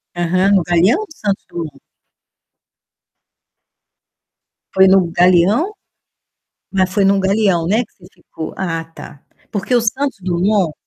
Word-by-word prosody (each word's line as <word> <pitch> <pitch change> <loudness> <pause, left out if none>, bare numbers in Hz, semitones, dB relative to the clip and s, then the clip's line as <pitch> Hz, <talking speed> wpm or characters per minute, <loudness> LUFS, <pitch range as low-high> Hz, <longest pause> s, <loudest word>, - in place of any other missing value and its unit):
Aham, 185 +3 +1
no 185 - +2
Galeão 175 - +2
ou 430 - -6
Santos 205 -9 -3
Dumont? 155 -5 -7 2.9
Foi 190 0 +5
no 190 -3 +3
Galeão? 185 - +3 1.0
Mas 185 -1 0
foi 200 0 +1
no 195 0 +3
Galeão, 190 -3 +1
né, 220 +5 +1
que - - -30
você 175 - -17
ficou? 160 - -9
Ah, 165 -3 -3
tá. 160 -3 -13 0.3
Porque 205 +4 -2
o 240 - +4
Santos 260 +3 -2
Dumont, 185 -1 0
190 Hz, 125 wpm, -17 LUFS, 175-210 Hz, 2.9 s, Foi